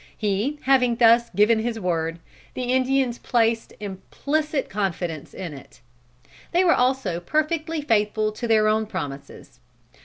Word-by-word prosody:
He 215 +7 -1
having 255 -3 +3
thus 235 0 +5
given 210 +4 +3
his 225 0 -2
word, 165 -3 -1 0.4
the 255 - -3
Indians 260 -1 +1
placed 230 -2 0
implicit 280 +9 -3
confidence 175 -6 -3
in 175 -5 -7
it. 135 - -14 0.7
They 355 +2 +4
were 345 - +5
also 250 -9 0
perfectly 310 - -1
faithful 215 -3 +1
to 235 +3 -5
their 215 -1 +4
own 215 0 +1
promises. 140 - -7
225 Hz, 130 wpm, -23 LUFS, 195-260 Hz, 0.7 s, thus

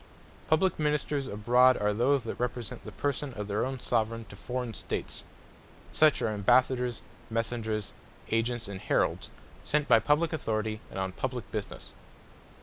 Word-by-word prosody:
Publique 160 +3 +2
Ministers 150 -2 0
abroad, 125 +4 +4
are 105 0 +1
those 130 +4 +2
that 115 - -5
represent 120 -2 -3
the - - -8
Person 145 -1 -2
of 105 -1 -4
their 105 +1 0
own 130 +1 -2
Soveraign, 115 -1 0
to - - -10
forraign 125 +2 -4
States. - - -4 0.7
Such 155 -1 +4
are - - +2
Ambassadors, 125 +3 +2 0.3
Messengers, 115 -2 -2 0.4
Agents, 115 0 0
and 100 -2 -6
Heralds, - - +1 0.3
sent 150 -1 +1
by 115 -2 +7
publique 150 +7 +2
Authoritie, 110 -6 -2
and - - -8
on 95 0 -1
publique 125 +5 -4
Businesse. 105 -2 -5
120 Hz, 145 wpm, -29 LUFS, 110-135 Hz, 0.7 s, by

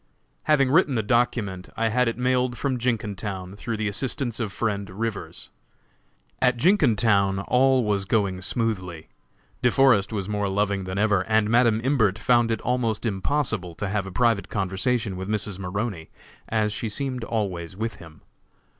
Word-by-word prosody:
Having 140 -4 +3
written 155 -4 +4
the 110 - 0
document, 105 -5 0
I 115 0 +1
had 125 +2 +2
it 115 - -1
mailed 125 -1 +1
from 130 -3 -1
Jenkintown, 105 -5 -3
through 115 +2 -4
the 110 0 -1
assistance 120 +3 -3
of 110 -4 -2
friend 100 -1 -2
Rivers. 110 +2 -5 0.9
At 125 -1 +3
Jenkintown 110 - +3
all 130 0 +4
was 100 -2 0
going 95 -3 0
smoothly. 95 -5 -3 0.5
De 125 - +4
Forest 120 -7 +4
was 100 -4 -3
more 105 -1 -1
loving 100 -1 0
than 95 +1 -4
ever, 105 -2 +3
and 110 -1 +2
Madam 115 -2 +4
Imbert 120 -7 +2
found 120 0 +3
it 110 -2 -1
almost 120 -3 -1
impossible 105 - -1
to 100 - -3
have 100 -1 -1
a - - -7
private 115 +1 +1
conversation 100 +2 -1
with 95 +2 -5
Mrs. 105 -2 -2
Maroney, 95 -2 -4 0.4
as 110 -1 +1
she 110 +1 -3
seemed 130 +1 -3
always 95 -6 -3
with 115 +2 -3
him. 80 -2 -14
110 Hz, 160 wpm, -25 LUFS, 100-120 Hz, 0.9 s, written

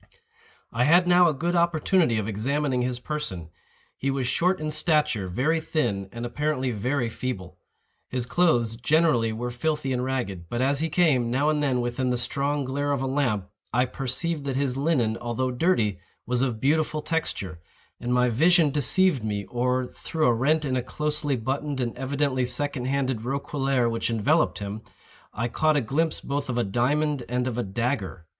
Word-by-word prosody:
I 120 +2 +1
had 175 +5 +5
now 180 -1 +6
a - - 0
good 175 +5 -1
opportunity 170 - +2
of 105 -1 -2
examining 130 +5 0
his 125 0 -1
person. 120 - -5 0.4
He 135 - -2
was 135 -1 -1
short 180 +7 +1
in 155 0 -3
stature, 150 - +2
very 135 - +1
thin, 105 -12 -1
and 120 0 -5
apparently 130 +1 -1
very 125 +4 -1
feeble. 95 -7 -5 0.5
His 125 -2 -2
clothes, 120 -7 +2
generally, 125 -3 +2
were 120 +3 -4
filthy 135 +2 -1
and 125 0 -1
ragged; 120 -9 -3
but 120 - -2
as 135 +2 +2
he 160 +1 0
came, 150 -8 +3
now 140 +5 +2
and 150 -1 0
then, 130 -4 +1
within 120 +1 -1
the 125 - +1
strong 140 +3 -1
glare 145 +2 -1
of 135 -1 -1
a - - 0
lamp, 130 -8 0 0.2
I 125 +1 +2
perceived 145 +5 -2
that 135 -2 -2
his 135 -2 0
linen, 135 -6 +1
although 125 +2 -1
dirty, 120 - +1 0.3
was 125 0 0
of 125 -5 0
beautiful 155 +3 +1
texture; 100 - -2 0.4
and 120 - -3
my 125 0 +3
vision 160 +5 +4
deceived 150 - +2
me, 105 -2 -2
or, 125 +1 0
through 155 +5 -3
a 120 - +5
rent 150 +6 +1
in 130 -2 -1
a 125 - +1
closely 150 +2 -1
buttoned 135 +4 -2
and 120 -2 -2
evidently 135 0 0
second 125 +1 -2
handed 130 -3 0
roquelaire 135 0 0
which 115 0 -1
enveloped 115 +9 +2
him, 100 +1 -5 0.5
I 115 - -2
caught 155 +5 +2
a - - +4
glimpse 155 +7 0
both 140 -1 -3
of 120 - -1
a 120 - +2
diamond 140 +7 0
and 125 +1 0
of 125 -1 -2
a - - 0
dagger. 100 - -3
130 Hz, 180 wpm, -25 LUFS, 120-150 Hz, 0.5 s, now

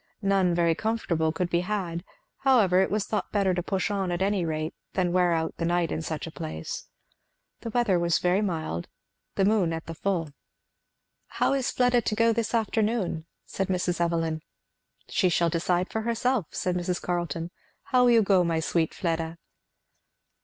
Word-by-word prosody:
None 195 -3 +3
very 170 -1 +3
comfortable 170 -6 0
could 175 +2 -2
be 170 - +3
had; 180 -3 -3 0.4
however 220 -9 +4
it 190 - +1
was 205 0 0
thought 215 - -2
better 195 -3 +2
to 175 - -1
push 195 +3 -1
on 195 -3 -1
at 175 +2 0
any 200 -2 +1
rate 155 0 -2 0.2
than 180 -2 +1
wear 180 -1 +3
out 165 -1 -1
the - - -3
night 175 -1 +1
in - - -2
such 155 -1 -4
a 165 - -7
place. 80 - -6 0.7
The 230 - -6
weather 220 -6 +2
was 170 -1 +2
very 180 +3 +2
mild; 160 - -2 0.5
the 195 - +3
moon 200 -5 +3
at 165 0 -4
the 165 - -6
full. 165 -2 -1 1.0
"How - - +1
is 270 -2 0
Fleda 245 -1 +3
to 215 - -1
go 230 +1 +4
this 230 +1 -1
afternoon?" 215 -7 0 0.2
said 195 - -3
Mrs. 180 -1 -1
Evelyn. 165 -2 0 0.7
"She 185 - +2
shall 170 -1 +2
decide 175 +2 0
herself," 230 -2 0
said 180 -1 -2
Mrs. 180 0 -1
Carleton. 175 -1 -3 0.3
"How 250 -1 +3
will - - +5
you 230 -2 +6
go, 190 -2 +4
my 165 -1 0
sweet 160 0 0
Fleda?" 165 -1 -2
180 Hz, 175 wpm, -27 LUFS, 165-210 Hz, 1.0 s, you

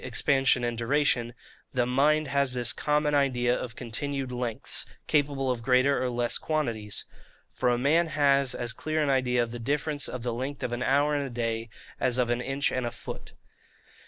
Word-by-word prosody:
expansion 135 -2 +2
and 120 -1 -2
duration) 120 -1 +1 0.4
the 125 -1 +2
mind 150 +4 +2
has 140 -1 +1
this 120 -2 0
common 150 0 +1
idea 125 -4 +2
of 120 -2 -5
continued 135 +2 -3
lengths, 120 -3 -2 0.2
capable 140 -3 +1
of 120 -2 -3
greater 130 +3 +3
or 130 - 0
less 120 -1 0
quantities. 115 -10 -2 0.5
For 125 - 0
a 120 - +2
man 155 +7 +3
has 140 -4 +2
as 120 -1 -2
clear 155 +4 -1
an 140 - +1
idea 125 -2 +2
of 115 - -5
the 120 - -6
difference 145 +3 -1
of 125 -2 -6
the 120 -1 -1
length 130 +4 -4
of 120 - -2
an 120 - -3
hour 140 +3 +2
and 145 -1 0
a - - -7
day, 115 -1 -2 0.3
as 125 -1 +2
of 120 -1 +1
an 120 0 0
inch 135 +2 0
and 130 -2 -1
a - - -3
foot. 115 - -8
2. - - -14
130 Hz, 195 wpm, -28 LUFS, 120-140 Hz, 0.5 s, greater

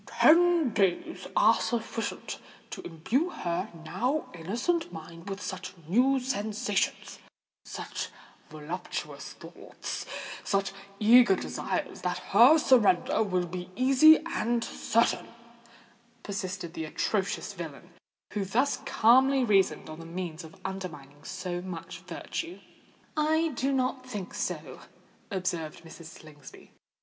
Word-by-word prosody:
"Ten 335 -4 +5
days 195 -5 0
are - - +6
sufficient 230 -1 -3 0.3
to - - -6
imbue 225 - -1
her 180 - -3 0.2
now 260 - -1
innocent 235 - -1
mind 165 +2 -9
with 195 0 -4
such 185 -1 -6
new 255 +9 +4
sensations—such 210 -5 -4 0.4
voluptuous 155 +4 -6
thoughts—such 195 -1 -5 0.3
eager 230 -1 +7
desires, - - -3
that - - -1 0.2
her 245 +10 +8
surrender 220 - +4
will 185 -4 +1
be 180 +1 -6
easy 270 +6 +7
and 235 -7 0
certain," 230 +1 +1 1.0
persisted 190 -3 -4
the 160 - -4
atrocious 200 +5 -1
villain, 170 -1 -8 0.4
who 205 - 0
thus 240 +9 +1
calmly 260 +4 +5
reasoned 195 -5 +2
on 155 0 -8
the 165 - -9
means 170 -1 -5
of 160 0 -13
undermining 150 -7 -7
so 180 -1 -4
much 180 -3 -7
virtue. 340 +1 -6 0.6
"I 315 +1 +2
do 270 0 -1
not 255 -1 0
think 205 -7 -6
so," - - -4 0.5
observed 175 -6 -3
Mrs. 165 0 -12
Slingsby. 155 -3 -13
195 Hz, 110 wpm, -29 LUFS, 175-255 Hz, 1.0 s, her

